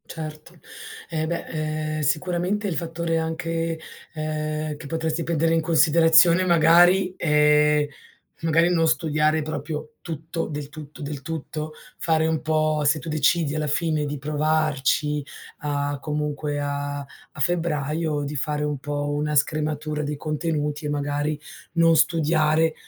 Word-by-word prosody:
Certo, 155 +1 -8 0.5
eh 160 -2 -1
beh, 170 +1 -3 0.5
ehm, - - -2
sicuramente 180 +7 0
il 180 - -2
fattore 165 0 -2
anche, 165 0 -2 0.3
ehm, 155 -1 -3
che 150 - -11
potresti 160 +1 -1
prendere 165 0 +1
in 165 - +3
considerazione 165 +2 +5
magari, 175 +2 +5
ehm, 150 -1 +4 0.6
magari 165 +2 +3
non 165 -2 +3
studiare 155 -1 +2
proprio 150 0 -5
tutto 165 +1 -4
del 150 -2 -5
tutto, 155 +1 -10
del 145 -1 -5
tutto, 155 -1 -5 0.3
fare 160 -1 +2
un 160 -1 0
po' 155 -1 +1
se 145 +2 +3
tu 150 - -8
decidi 155 0 +2
alla 155 0 -1
fine 155 0 0
di 145 0 -4
provarci 150 -1 0 0.3
a 145 -1 -2
comunque 150 -1 -2
a 145 0 -3
a 140 +1 -13
febbraio, 155 -1 0
di 145 +1 -4
fare 150 +2 -1
un 150 -1 -2
po' 145 +1 -3
una 150 +1 -1
scrematura 150 +1 0
dei 145 +1 -3
contenuti, 150 0 -2
e - - -1
magari 145 +1 -1 0.3
non 165 -1 +4
studiare, 160 -1 +3
155 Hz, 135 wpm, -24 LUFS, 150-165 Hz, 0.6 s, considerazione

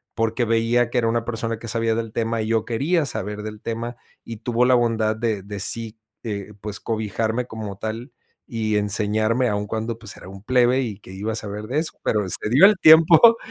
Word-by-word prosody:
porque 115 +2 0
veía 115 +1 +2
que 125 - +1
era 115 - +1
una 115 0 0
persona 115 -1 -3
que 115 +1 -9
sabía 115 0 0
del 115 -1 -3
tema 115 0 -1
y - - -4
yo 115 -1 +1
quería 150 +7 0
saber 105 -2 -4
del 105 0 -8
tema 115 +1 -4 0.3
y 115 -2 -8
tuvo 120 +2 0
la 125 0 +5
bondad 115 -2 +1
de 110 -2 -2
de 100 +1 -7
sí, 115 +3 -1 0.3
eh, 105 -2 -5
pues 105 -2 -5
cobijarme 110 +2 -2
como 110 -4 -7
tal 115 +4 -5 0.3
y 110 -4 -2
enseñarme 110 +4 +1
aún 105 0 -2
cuando 110 +2 -4
pues 110 -3 -8
era - - -12
un 95 +1 -12
plebe 125 +1 +3
y 105 -5 -5
¿que 95 - -14
iba 105 +4 -4
a - - -3
saber 105 -1 -5
de 140 +5 0
eso?, 160 - -3
pero, 105 -2 0
excedió 120 - +4
el 210 +1 +6
tiempo. 165 +8 +7
115 Hz, 210 wpm, -22 LUFS, 105-120 Hz, 0.3 s, tiempo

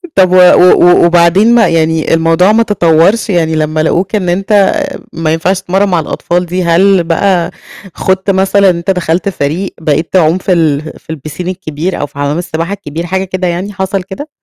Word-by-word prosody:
طَب 185 -2 +3
و - - +3
و 180 -1 +5
وبعدين 175 +7 +3
ما 225 -4 +4
يعني 160 -1 0
الموضوع 165 +4 +2
ما 225 +2 +3
تطورش 190 +1 +1
يعني 165 -4 0
لمّا 155 0 -1
لقوك 180 +5 -1
إن 185 -4 -1
أنت 195 - +1 0.4
ما 160 -1 -1
ينفعش 185 +4 -1
تتمرن 195 +3 0
مع 175 -2 +1
الأطفال 175 +3 -2
دي، 180 +2 -3
هل 180 +2 +3
بقى 175 +1 0 0.4
خُضت 190 +1 -2
مثلًا 195 0 +2
أنت 170 +2 -1
دخلت 180 +1 -1
فريق 175 +2 -3
بقيت 160 +1 -1
تعوم 170 -2 +3
في 185 0 -1
ال 155 -4 +1 0.2
في 160 - -8
الpiscine 155 +4 -8
الكبير 180 -1 -4
أو - - -2
في - - -17
حمَّام 145 +2 -2
السباحة 170 +1 -4
الكبير 170 -4 -6
حاجة 190 +2 -2
كده 185 -1 -3
يعني، 180 +4 -4
حصَل 190 0 -3
كده؟ 200 +11 -9
180 Hz, 185 wpm, -11 LUFS, 165-190 Hz, 0.4 s, و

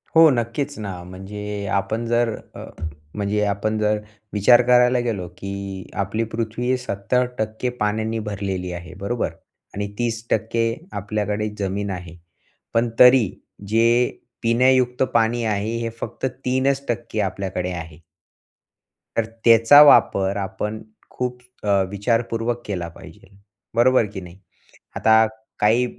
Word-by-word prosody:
हो 165 0 +8
नक्कीच 130 +4 -2
ना, 95 -4 -6
म्हणजे 100 +3 -6
आपण 110 +4 -1
जर 120 -1 +1 0.2
अ, - - -8 0.5
म्हणजे 105 0 0
आपण 105 +2 -1
जर 105 0 +1 0.3
विचार 110 +4 +6
करायला 125 0 +5
गेलो 110 -7 -2
की 100 -1 -6 0.2
आपली 110 +4 -2
पृथ्वी 115 +3 -1
70% 125 +1 -2
पाण्याने 110 +2 0
भरलेली 95 -3 -4
आहे 90 +1 -8
बरोबर? 115 +5 -1 0.5
आणि 100 +1 -2
30% 115 -1 0 0.3
आपल्याकडे 105 +1 -2
जमीन 100 +1 -2
आहे. 90 -2 -7 0.6
पण 115 +1 +2
तरी 125 -5 +7 0.4
जे 115 +3 +3 0.6
पिण्यायुक्त 125 +2 +3
पाणी 115 +1 +2
आहे, 110 +1 -1
हे 115 0 -2
फक्त - - -4
3% 130 -3 -1
आपल्याकडे 95 -2 -3
आहे. 80 -3 -7 1.2
तर 115 - +2 0.2
त्याचा 115 +5 +8
वापर 100 -8 +5
आपण 100 +2 -4 0.3
खूप 125 0 -4 0.2
अ, 100 -2 +3
विचारपूर्वक 115 +3 -1
केला 90 -4 -3
पाहिजे, - - -14 0.5
बरोबर 120 0 +4
की 95 - -5
नाही? 90 +1 -12 0.6
आता 110 0 +5 0.3
काही, 115 +4 +4
110 Hz, 120 wpm, -22 LUFS, 100-120 Hz, 1.2 s, हो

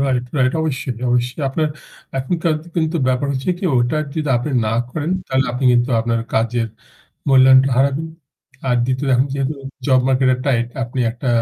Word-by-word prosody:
Right, 130 -3 +1
right. 130 -1 +2
অবশ্যই 135 -5 -2 0.2
অবশ্যই 125 +4 0
আপনার 155 +3 0 0.5
এখনকার 165 +4 0 0.2
কিন্তু 160 0 0
ব্যাপার 130 +2 +1
হচ্ছে 130 +5 -1
কি 190 - -6
ওটা 120 +4 +1 0.2
যদি 155 -2 -2
আপনি 150 +5 -4 0.2
না 110 - 0 0.2
করেন, 155 +4 -3 0.2
তাহলে 130 0 +1
আপনি 125 +2 -3
কিন্তু 120 +2 +2
আপনার 115 0 0
কাজের 115 +1 +1 0.6
মূল্যায়নটা 130 0 +6
হারাবেন। 140 +4 +1 0.6
আর 125 - +3
২য় 130 +2 -1
এখন 130 +2 +3
যেহেতু 140 +1 -1 0.3
জব 130 -2 +4
মার্কেট 130 0 +3
এ - - -3
টাইট 120 -4 +1 0.2
আপনি 120 +2 -4
একটা 125 +2 -5
130 Hz, 170 wpm, -19 LUFS, 125-140 Hz, 0.6 s, মূল্যায়নটা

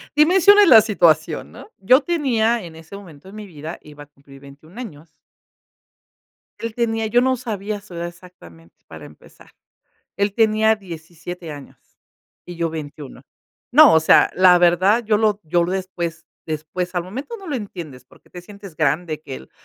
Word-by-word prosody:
dimensiones 380 +6 +5
la 225 -3 +8
situación, 170 -7 +1
¿no?, - - -13
yo 255 +9 +4
tenía 240 - 0
en 165 -2 -11
ese 160 +4 -12
momento 180 -5 -14
de 195 - -13
mi 215 -1 -9
vida, 160 -1 -9
iba 150 -1 -13
a - - -16
cumplir 140 -1 -19
21 145 - -15
años 165 -10 -11 1.4
él 230 -1 -5
tenía, 225 -2 -1
yo 240 +3 +2
no 260 0 +1
sabía 210 -4 -5
su 200 -4 -14
edad 170 0 -4
exactamente, 170 - -16
para - - -11
empezar, - - -18 0.7
él 200 0 0
tenía 220 0 +2
17 170 -2 -10
años 145 -2 -12 0.7
y 175 - -9
yo 170 -1 -1
21 150 -3 -9 0.5
no, 300 +3 +7
o 160 - +5
sea, 160 - +4
la 180 -1 +6
verdad 185 +6 +3
yo 210 -1 +2
lo 210 -1 +1
yo 170 +2 0
después 175 -3 -5 0.2
después, 160 +4 -5
al 175 - -1
momento 265 - -7
no 390 - -13
lo 290 - -3
entiendes, 170 - -8
porque - - -23
te 180 - -10
sientes 200 -2 -13
grande, 155 0 -1
que 135 -4 -8
el 65 - -14
180 Hz, 170 wpm, -20 LUFS, 160-220 Hz, 1.4 s, la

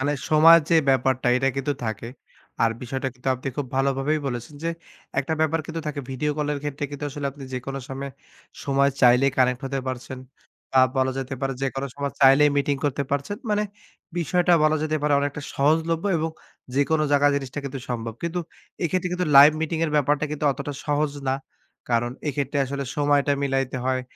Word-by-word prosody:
মানে 145 +2 +1 0.2
সময়ের 165 +2 +8
যে - - +5
ব্যাপারটা 130 -1 +2
এটা 135 +1 +2
কিন্তু 135 +2 0
থাকে। 110 +1 -4 0.5
আর 115 - +4
বিষয়টা 130 +2 -3
কিন্তু 125 +1 -5
আপনি 130 +2 -5
খুব 145 - -2
ভালোভাবেই 135 +3 +1
বলেছেন 120 +2 -5
যে - - +1 0.5
১ 135 - +1
টা 160 - +1
ব্যাপার 160 +1 +2
কিন্তু 165 -1 -4
থাকে 145 -1 -3
ভিডিও 135 +3 -1
কলের 150 -1 -1
ক্ষেত্রে 145 -1 -3
কিন্তু 145 0 -6
আসলে 140 0 -4
আপনি 140 0 -10
যেকোনো 135 +2 -4
সময়ে, 135 +1 -5 0.5
সময় 140 0 +3
চাইলেই 125 +2 +5
কানেক্ট 125 -1 +3
হতে 135 0 -2
পারছেন 130 0 -5 0.5
বা 130 - +6 0.2
বলা 130 0 +2
যেতে 135 0 -4
পারে 135 -1 -1
যেকোনো 135 0 -2
সময় 140 -1 -3
চাইলেই 140 +2 +6
মিটিং 140 0 +1
করতে 140 0 0
পারছেন। 140 +8 -2
মানে 210 0 +2 0.6
বিষয়টা 175 +1 +2
বলা 155 0 +4
যেতে 155 0 0
পারে 150 0 +2
অনেকটা 145 +1 -2
সহজলভ্য 160 +4 +1
এবং 160 +1 -1 0.4
যেকোনো 155 +3 +2
জাগায় 145 0 +4
জিনিসটা 135 -1 -4
কিন্তু 135 0 -4
সম্ভব। 115 -2 -3
কিন্তু 170 +1 -2 0.4
এক্ষেত্রে 180 +2 0
কিন্তু 180 0 -1
লাইভ 140 +2 +10
মিটিং 160 +1 -1
এর 155 - -1
ব্যাপারটা 145 +1 +2
কিন্তু 150 0 -4
অতটা 140 +2 -5
সহজ 150 0 +1 0.2
না। 130 - +2 0.6
কারণ 120 0 +1 0.2
এক্ষেত্রে 140 0 -2
আসলে 140 +1 -4
সময়টা 145 -1 +2
মিলাইতে 135 -1 0
হয় 130 0 +1
140 Hz, 180 wpm, -24 LUFS, 135-150 Hz, 0.6 s, লাইভ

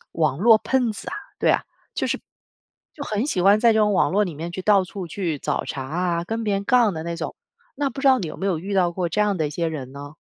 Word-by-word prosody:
网 155 -4 0
络 220 +3 +6
喷 250 0 +1
子 205 - -8
啊， - - -4 0.2
对 - - +3
啊。 - - +2 0.3
就 - - -1
是 - - -1 0.8
就 285 - -6
很 215 +4 -1
喜 185 -11 0
欢 200 +2 +5
在 235 -1 +5
这 220 - +2
种 210 -1 +3
网 - - +3
络 205 +3 +2
里 175 - -5
面 165 +4 -5
去 185 +1 -5
到 200 -2 +4
处 185 0 -7
去 165 -3 -3
找 - - -2
茬 135 - -4
啊， 170 +4 -1
跟 225 +3 -3
别 205 -2 +1
人 195 - -2
杠 235 -4 +3
的 160 - -4
那 170 +1 -4
种， - - -5 0.4
那 285 -2 0
不 270 - -7
知 275 - +4
道 260 -1 +5
你 180 - -3
有 - - -7
没 195 - -3
有 185 -5 0
遇 195 +5 -4
到 180 -2 +3
过 175 0 -2
这 190 +6 -1
样 210 -2 +2
的 155 - 0
一 - - -4
些 165 +2 -1
人 135 -5 -6
呢？ 145 +1 -9
190 Hz, 305 characters per minute, -23 LUFS, 165-215 Hz, 0.8 s, 络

